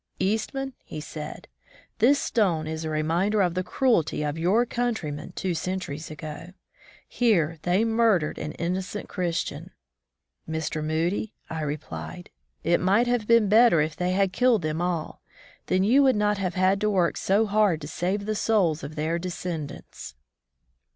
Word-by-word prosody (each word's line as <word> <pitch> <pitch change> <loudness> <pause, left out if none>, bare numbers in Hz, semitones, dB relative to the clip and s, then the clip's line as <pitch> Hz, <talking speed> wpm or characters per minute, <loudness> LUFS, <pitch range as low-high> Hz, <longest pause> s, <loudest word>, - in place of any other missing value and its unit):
^'Eastman/' 225 +7 -1 0.3
said 150 0 -8 0.5
he, 225 - +3
'^this 285 - +6
stone 185 - +1
is 160 +1 -4
a 160 - -3
reminder 165 +7 +1
of 180 -3 +2
the 185 +1 -1
cruelty 185 - +1
of 150 0 -2
your 185 +9 +2
countrymen 225 -12 -3
two 185 -2 -1
centuries 165 -3 -4
ago. 155 +3 -8 0.5
Here 170 -10 +1
they 185 +5 +2
murdered 225 -8 +2
an 150 - -4
innocent 185 +4 -3
Chris 175 -3 -1
tian.'* - - -8 0.8
"Mr. 160 -1 -2
Moody," 170 +7 -1 0.2
I 160 -1 -3
replied, 155 +4 -6 0.3
it 170 +1 +3
might 200 +6 +3
have 240 -3 0
been 230 -2 +5
better 220 -4 +6
if 155 +1 0
they 180 +1 -1
had 195 -1 +1
killed 245 -6 +3
them 155 +1 -1
all. 175 -3 -2 0.5
Then 185 0 +2
you 245 +8 +5
would 265 -3 +4
not 210 -1 +1
have 185 -2 -2
had 190 +2 +2
to 210 - +2
work 180 -4 +2
so 205 +4 +2
hard 205 -5 +2
to 145 - -6
save 190 +6 -2
the 215 - -1
souls 195 -8 +1
of 145 +2 -7
their 160 +2 -1
descendants." 170 - -6
185 Hz, 160 wpm, -26 LUFS, 160-210 Hz, 0.8 s, ^this